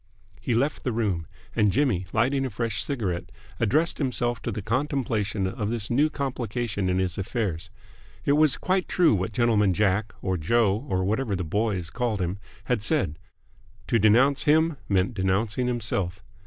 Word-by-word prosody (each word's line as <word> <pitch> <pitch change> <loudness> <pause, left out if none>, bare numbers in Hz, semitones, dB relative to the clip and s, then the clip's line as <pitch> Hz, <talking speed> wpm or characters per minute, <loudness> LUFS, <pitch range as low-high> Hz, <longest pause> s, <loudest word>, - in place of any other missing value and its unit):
He 120 - 0
left 140 +6 0
the 125 - 0
room, 100 -8 -1 0.3
and 105 -2 +3
Jimmy, 110 -8 +1
lighting 130 +5 +1
a 130 - -1
fresh 115 -2 -1
cigarette, 100 -11 -3 0.3
addressed 150 +9 +2
himself 120 -4 -1
to - - -3
the 105 - -5
contemplation 115 -5 -1
of 100 +2 -2
this 115 -1 -2
new 145 +6 +3
complication 120 -8 -2
in 90 - +1
his 95 -2 -1
affairs. 95 -4 -2 0.6
It - - +3
was 150 -4 +4
quite 185 0 0
true 170 -6 +4
what 95 +1 -1
Gentleman 105 -4 +2
Jack 105 +1 +1
or 95 -1 0
Joe 110 - +1
or 95 0 +1
whatever 110 +2 0
the 90 - -2
"boys" 95 0 -1
called 120 -4 -1
him 90 +2 -2 0.2
had 125 -4 0
said. 110 - 0 0.7
To - - +3
denounce 125 +7 +4
him 160 +1 +3
meant 95 +3 +2
denouncing 105 +5 0
himself. 100 -6 -2
110 Hz, 165 wpm, -26 LUFS, 95-130 Hz, 0.7 s, was